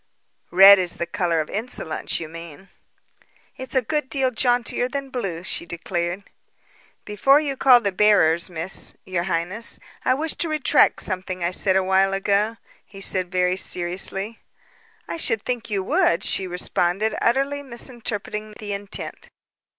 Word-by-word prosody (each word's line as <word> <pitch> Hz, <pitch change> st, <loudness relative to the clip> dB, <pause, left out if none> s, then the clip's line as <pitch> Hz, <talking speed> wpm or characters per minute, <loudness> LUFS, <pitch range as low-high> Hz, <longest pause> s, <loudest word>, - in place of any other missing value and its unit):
"Red 195 Hz, +2 st, +8 dB
is 180 Hz, -2 st, -1 dB
the 170 Hz, -, -3 dB
color 170 Hz, -2 st, -1 dB
of 155 Hz, -, -7 dB
insolence, 195 Hz, -7 st, -4 dB
you 165 Hz, -, -6 dB
mean." 165 Hz, +3 st, -11 dB, 0.9 s
"It's 260 Hz, +1 st, -8 dB
a 260 Hz, -, +3 dB
good 295 Hz, +2 st, -2 dB
deal 265 Hz, -2 st, +1 dB
jauntier 245 Hz, +1 st, 0 dB
than 275 Hz, 0 st, -5 dB
blue," 190 Hz, -10 st, -4 dB
she 170 Hz, -, -4 dB
declared. 175 Hz, +2 st, -3 dB, 0.8 s
"Before 270 Hz, +8 st, +3 dB
you 285 Hz, -3 st, -2 dB
call 255 Hz, -2 st, +6 dB
the 200 Hz, -, -1 dB
bearers, 180 Hz, -5 st, +3 dB
Miss 170 Hz, +2 st, -5 dB
your 180 Hz, -2 st, -2 dB
highness, 185 Hz, +5 st, -2 dB, 0.3 s
I 255 Hz, -, +2 dB
wish 310 Hz, +3 st, -1 dB
to 335 Hz, -, +1 dB
retract 305 Hz, -3 st, +3 dB
something 185 Hz, -2 st, -3 dB
I 170 Hz, -, 0 dB
said 190 Hz, +1 st, +5 dB
awhile 190 Hz, +1 st, +2 dB
ago," 205 Hz, +3 st, 0 dB, 0.3 s
he 195 Hz, -, -14 dB
said 185 Hz, -2 st, -1 dB
very 180 Hz, 0 st, +1 dB
seriously. 195 Hz, +5 st, -1 dB, 0.7 s
"I -, -, -5 dB
should 225 Hz, -9 st, +1 dB
think 240 Hz, -2 st, -3 dB
you 200 Hz, -2 st, -1 dB
would," 170 Hz, -2 st, +1 dB
she 190 Hz, -, -1 dB
responded, 180 Hz, +3 st, -1 dB
utterly 275 Hz, +4 st, +1 dB
misinterpreting 230 Hz, -4 st, -5 dB
his 210 Hz, -1 st, -6 dB
intent. 200 Hz, +1 st, -6 dB
195 Hz, 150 wpm, -22 LUFS, 180-240 Hz, 0.9 s, Red